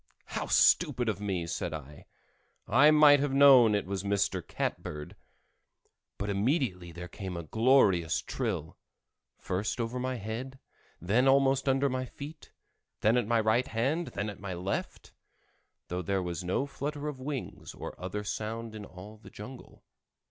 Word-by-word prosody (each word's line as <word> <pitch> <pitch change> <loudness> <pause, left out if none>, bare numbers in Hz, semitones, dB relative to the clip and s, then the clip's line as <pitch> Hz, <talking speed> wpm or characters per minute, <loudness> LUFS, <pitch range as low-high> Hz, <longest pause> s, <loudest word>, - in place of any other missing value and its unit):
"How - - -2
stupid 125 -1 +4
of 105 -2 -3
me!" 95 -4 -2
said 85 0 -3
I. 75 -1 -11 0.6
"I 135 +8 +6
might 150 -2 +7
have 140 -1 0
known 130 -6 +7
it 100 - -1
was 95 0 -3
Mr. 100 -2 0
Catbird." 75 -1 -5 1.0
But 100 0 -2
immediately 100 - 0
there 90 +1 -8
came 95 0 -6
a 85 - -5
glorious 100 - +3
trill—first 100 +6 -5
over 115 +2 -2
my 130 +1 -2
head, 120 +4 -6 0.4
then 110 +10 +2
almost 135 0 +3
under 135 +1 +3
my 130 -1 -2
feet, 150 +5 -10 0.5
then 110 +3 +4
at 120 -4 +1
my 115 0 +3
right 110 +4 +2
hand, 135 +10 -1
then 100 +1 -4
at 100 - -13
my 95 -2 -5
left; 90 +3 -4 0.7
though 90 +1 -3
there 95 +2 -1
was 90 +1 -4
no 90 +10 0
flutter 145 +1 -5
of 145 -3 -5
wings 135 -1 -6
or - - -7
other 95 +3 -4
sound 110 +2 -4
in 105 -1 -7
all 100 +4 -12
the 110 - -14
jungle. 125 +5 -11
110 Hz, 155 wpm, -30 LUFS, 95-135 Hz, 1.0 s, might